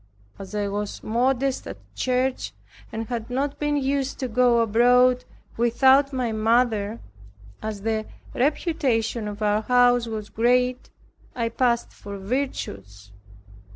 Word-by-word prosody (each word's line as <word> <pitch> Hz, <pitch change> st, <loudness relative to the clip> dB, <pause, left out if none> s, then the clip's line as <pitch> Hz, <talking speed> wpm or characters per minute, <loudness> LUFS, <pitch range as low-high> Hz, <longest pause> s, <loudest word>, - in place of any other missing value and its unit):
As 195 Hz, +2 st, -8 dB
I 205 Hz, -1 st, 0 dB
was 205 Hz, +1 st, -4 dB
modest 255 Hz, +4 st, 0 dB
at -, -, -7 dB, 0.2 s
church 255 Hz, -, -1 dB, 0.4 s
and 225 Hz, +1 st, -4 dB
had 230 Hz, 0 st, -5 dB
not 275 Hz, +3 st, -2 dB
been 295 Hz, 0 st, 0 dB
used 275 Hz, -1 st, -1 dB
to 260 Hz, -, -1 dB
go 240 Hz, 0 st, +3 dB
abroad 245 Hz, +3 st, +4 dB, 0.3 s
without 265 Hz, +4 st, +4 dB
my 255 Hz, -4 st, -1 dB
mother, 220 Hz, -1 st, +1 dB, 0.6 s
as 215 Hz, -2 st, -5 dB
the 220 Hz, -1 st, -1 dB, 0.3 s
reputation 255 Hz, -6 st, 0 dB
of 210 Hz, +1 st, -5 dB
our 210 Hz, 0 st, +2 dB
house 245 Hz, 0 st, +3 dB
was 215 Hz, -2 st, -5 dB
great, 250 Hz, +2 st, +1 dB, 0.5 s
I 230 Hz, -2 st, -1 dB
passed 235 Hz, 0 st, 0 dB
for 200 Hz, -1 st, -8 dB
virtuous. 105 Hz, -, -4 dB
240 Hz, 125 wpm, -24 LUFS, 215-255 Hz, 0.6 s, abroad